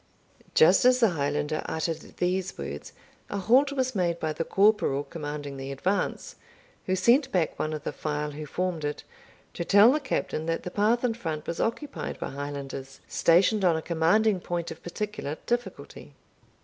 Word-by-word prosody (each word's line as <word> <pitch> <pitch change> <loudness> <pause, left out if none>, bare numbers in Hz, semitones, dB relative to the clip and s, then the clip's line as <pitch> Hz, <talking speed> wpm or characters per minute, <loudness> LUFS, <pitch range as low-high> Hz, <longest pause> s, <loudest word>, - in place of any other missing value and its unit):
Just 470 - +6
as 250 0 +5
the 230 -5 +4
Highlander 150 0 -1
uttered 160 0 -2 0.2
these 180 +1 -1
words, 70 +1 -6 0.4
a 205 - -3
halt 250 +9 +4
was 260 -2 -1
made 175 -4 0
by 155 -1 -1
the 165 - -2
corporal 195 -8 +2
commanding 145 -3 -6
the 135 0 -6
advance, 185 +9 -2 0.5
who 185 - +2
sent 255 +8 +3
back 175 -4 0
one 155 - -1
of 155 -1 -5
the - - -3
file 150 +1 -3
who 150 +1 -7
formed 180 0 -2
it, 145 0 -3 0.5
to - - -3
tell 205 +6 +7
the 300 - +1
Captain 165 - -2
that 165 0 -1
the 180 - -5
path 220 +5 +2
in 245 -2 +2
front 160 -9 -5
was 170 - -4
occupied 280 +6 -3
by - - -5
Highlanders, 140 -1 -6
stationed 190 +5 +3
on 175 -3 +4
a 160 - -2
commanding 185 +5 +2
point 175 -1 -3
of 165 - -9
particular 175 -5 -4
difficulty. 240 0 -4
170 Hz, 175 wpm, -27 LUFS, 150-215 Hz, 0.5 s, tell